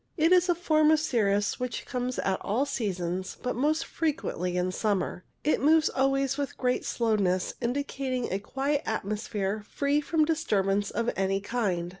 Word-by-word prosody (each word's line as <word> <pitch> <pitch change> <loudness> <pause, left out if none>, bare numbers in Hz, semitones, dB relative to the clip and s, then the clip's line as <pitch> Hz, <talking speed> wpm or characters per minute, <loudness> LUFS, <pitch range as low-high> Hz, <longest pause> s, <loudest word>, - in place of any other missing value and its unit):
It 325 +2 +3
is 365 0 +5
a 350 - +4
form 310 -3 +3
of 315 0 +5
cirrus 205 -8 +1
which 250 -1 -3
comes 250 0 -3
at 190 -1 -1
all 235 +8 0
seasons, 185 -7 -3
but 250 - -1
most 305 +6 +1
frequently 180 - -2
in 180 +1 0
summer; 195 -3 -1 0.2
it 300 - +2
moves 315 +3 +5
always 270 +1 +1
with 280 - -3
great 250 -1 0
slowness, 200 -6 +1
indicating 255 0 -2
a 195 - 0
quiet 275 +7 -1
atmosphere 210 0 -2
free 285 +1 +1
from 310 +1 +2
disturbance 205 -10 +1
of 235 +2 -1
any 195 0 +1
kind. 195 -5 -1
245 Hz, 160 wpm, -28 LUFS, 195-285 Hz, 0.2 s, is